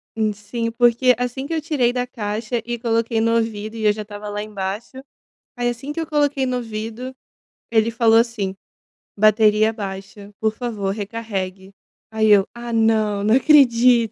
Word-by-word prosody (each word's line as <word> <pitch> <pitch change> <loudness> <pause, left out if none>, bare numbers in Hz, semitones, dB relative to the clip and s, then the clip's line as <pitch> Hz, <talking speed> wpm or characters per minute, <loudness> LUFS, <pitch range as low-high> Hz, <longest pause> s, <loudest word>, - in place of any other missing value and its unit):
E 215 -1 0
sim, 230 +3 -4
porque 240 +2 +4
assim 250 +2 -3
que 330 - -4
eu 320 - -1
tirei 285 -6 +1
da 250 0 -1
caixa 225 0 -3
e 240 -1 -4
coloquei 230 -1 0
no 230 +1 +2
ouvido 220 -1 -2
e 220 -1 -3
eu 210 - +5
já 215 - -6
estava 210 0 -8
lá 205 0 -4
embaixo, 210 +5 -6 0.5
aí 245 0 0
assim 245 +5 -4
que 330 - -4
eu 325 - -3
coloquei 290 -3 +1
no 255 -1 -1
ouvido, 230 +2 -5 0.6
ele 225 0 +2
falou 225 -1 +4
assim: 230 -5 0 0.6
"Bateria 215 +1 +4
baixa, 200 0 -8
por 220 0 0
favor 215 -5 -3
recarregue". 195 -3 -5 0.4
Aí 220 -1 +2
eu: 200 -1 +5
"Ah 235 0 -7
não, 215 -2 +2
não 215 +3 +4
acredito". 250 -5 +5
225 Hz, 170 wpm, -21 LUFS, 210-240 Hz, 0.6 s, eu